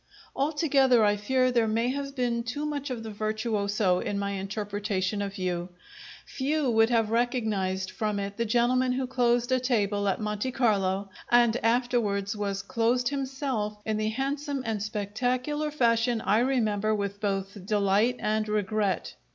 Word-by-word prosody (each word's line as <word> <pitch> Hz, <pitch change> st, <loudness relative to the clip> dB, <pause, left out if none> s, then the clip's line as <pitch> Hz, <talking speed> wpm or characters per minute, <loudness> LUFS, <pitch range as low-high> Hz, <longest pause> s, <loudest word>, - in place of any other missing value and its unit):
Altogether, 275 Hz, -5 st, +3 dB
I 205 Hz, 0 st, +3 dB
fear 255 Hz, +5 st, +1 dB
there 235 Hz, -2 st, +2 dB
may 230 Hz, +3 st, +1 dB
have 275 Hz, +1 st, -4 dB
been 240 Hz, -2 st, 0 dB
too 245 Hz, +6 st, -4 dB
much 290 Hz, -1 st, -3 dB
of 240 Hz, -3 st, -4 dB
the 220 Hz, -, -6 dB
virtuoso 210 Hz, -3 st, 0 dB
in 200 Hz, -, -2 dB
my 200 Hz, 0 st, -2 dB
interpretation 205 Hz, 0 st, -2 dB
of 200 Hz, +1 st, -4 dB
you; 180 Hz, -1 st, -2 dB, 0.6 s
few 285 Hz, 0 st, -1 dB
would 225 Hz, 0 st, +4 dB
have 225 Hz, -3 st, +2 dB
recognized 215 Hz, -6 st, 0 dB
from 210 Hz, -2 st, -2 dB
it 200 Hz, 0 st, -4 dB
the 230 Hz, -, 0 dB
gentleman 250 Hz, +3 st, +2 dB
who 260 Hz, +1 st, -1 dB
closed 245 Hz, -1 st, +1 dB
a 255 Hz, -, +3 dB
table 205 Hz, -5 st, 0 dB
at 195 Hz, -, 0 dB
Monte 210 Hz, +3 st, -2 dB
Carlo 195 Hz, -5 st, +1 dB, 0.2 s
and 240 Hz, -1 st, +5 dB
afterwards 230 Hz, -5 st, 0 dB
was 200 Hz, -2 st, -3 dB
closed 235 Hz, +4 st, +1 dB
himself 265 Hz, -6 st, -3 dB
in 220 Hz, -1 st, -1 dB
the 215 Hz, 0 st, 0 dB
handsome 275 Hz, +3 st, -2 dB
and 220 Hz, -2 st, -2 dB
spectacular 245 Hz, +8 st, -1 dB
fashion 235 Hz, -4 st, +2 dB
I 210 Hz, +3 st, +2 dB
remember 215 Hz, -5 st, +1 dB
with 200 Hz, -1 st, -4 dB
both 195 Hz, -1 st, -2 dB
delight 205 Hz, +4 st, +2 dB
and 215 Hz, 0 st, -1 dB
regret. 210 Hz, -1 st, -1 dB
220 Hz, 155 wpm, -27 LUFS, 205-250 Hz, 0.6 s, and